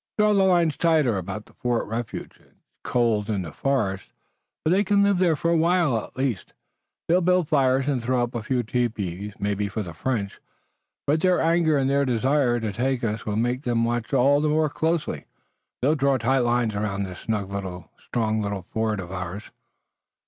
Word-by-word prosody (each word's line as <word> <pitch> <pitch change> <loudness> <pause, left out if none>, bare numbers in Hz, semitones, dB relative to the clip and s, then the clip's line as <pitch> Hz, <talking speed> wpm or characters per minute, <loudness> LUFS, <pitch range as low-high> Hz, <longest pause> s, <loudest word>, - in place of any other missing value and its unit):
"Draw 210 0 +4
the 200 - +3
lines 175 -4 +3
tighter 155 -9 +3
about 100 +3 -6
Fort 120 -1 0
Refuge. 115 +2 -5
It's - - -28 0.3
cold 115 -4 +1
in 100 -4 -1
the 80 - -7
forest, 105 - -1 0.6
but 155 - +3
they 195 +3 +4
can 200 0 +3
live 200 -2 +2
there 175 -4 +3
for 165 +3 0
a - - +3
while 165 -4 +3
at - - -11
least. 130 -8 -2 0.5
They'll 175 +2 +3
build 180 -2 +2
fires 135 -2 +2
and 135 -4 0
throw 125 +1 +1
up 120 - -4
a 120 - -3
few 125 +2 -1
tepees, 105 -5 -2
maybe 100 0 -1
for 110 +1 -3
the 90 -3 -8
French. 100 +2 -3 0.7
But 155 +2 +1
their 185 0 +3
anger 165 -2 +3
and 135 -1 +1
their 140 +1 +2
desire 125 0 +1
to 110 -2 -3
take 125 +2 -1
us 110 -1 -2
will 105 - -1
make 120 +3 0
them 120 -3 0
watch 120 -1 -2
all 140 +2 +4
the 155 - +1
more 155 0 +2
closely. 160 - -1 0.6
They'll 145 +4 +4
draw 140 -2 +2
tight 130 +3 +1
lines 120 -2 +1
around 100 -1 -2
this 90 -2 -7
snug 105 -3 -3
little, 95 -3 -6
strong 110 -2 -1
little 100 -2 -3
fort 110 -2 -1
of 90 -1 -7
ours." 95 +2 -6
120 Hz, 190 wpm, -24 LUFS, 105-150 Hz, 0.7 s, Draw